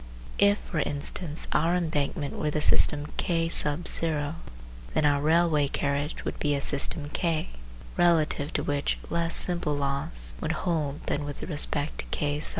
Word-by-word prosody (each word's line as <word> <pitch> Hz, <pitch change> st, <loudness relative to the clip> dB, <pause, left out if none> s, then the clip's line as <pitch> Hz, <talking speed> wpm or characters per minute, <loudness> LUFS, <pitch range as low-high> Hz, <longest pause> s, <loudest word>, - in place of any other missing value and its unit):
If, 200 Hz, 0 st, +4 dB
for 165 Hz, -, -5 dB
instance, 150 Hz, +2 st, 0 dB
our 170 Hz, +3 st, +1 dB
embankment 150 Hz, -4 st, -2 dB
were 150 Hz, -, -2 dB
the 150 Hz, -, -2 dB
system 150 Hz, 0 st, +3 dB
K 165 Hz, -2 st, 0 dB
then 150 Hz, -1 st, +1 dB, 0.7 s
our 145 Hz, -1 st, +2 dB
railway 160 Hz, -1 st, +2 dB
carriage 140 Hz, +2 st, -3 dB
would -, -, -5 dB
be 145 Hz, -1 st, 0 dB
a -, -, -1 dB
system 145 Hz, +1 st, +3 dB
K, 165 Hz, -1 st, -2 dB, 0.5 s
relative 160 Hz, -4 st, +2 dB
to -, -, -1 dB
which 145 Hz, 0 st, -1 dB
less 170 Hz, 0 st, +1 dB
simple 170 Hz, -5 st, +2 dB
laws 140 Hz, +3 st, -1 dB
would 160 Hz, 0 st, -1 dB
hold 155 Hz, -5 st, -2 dB
than 145 Hz, -, -2 dB
with 145 Hz, -1 st, -6 dB
respect 145 Hz, -2 st, +1 dB
to -, -, -4 dB
K. 145 Hz, 0 st, -2 dB
150 Hz, 150 wpm, -26 LUFS, 145-165 Hz, 0.7 s, If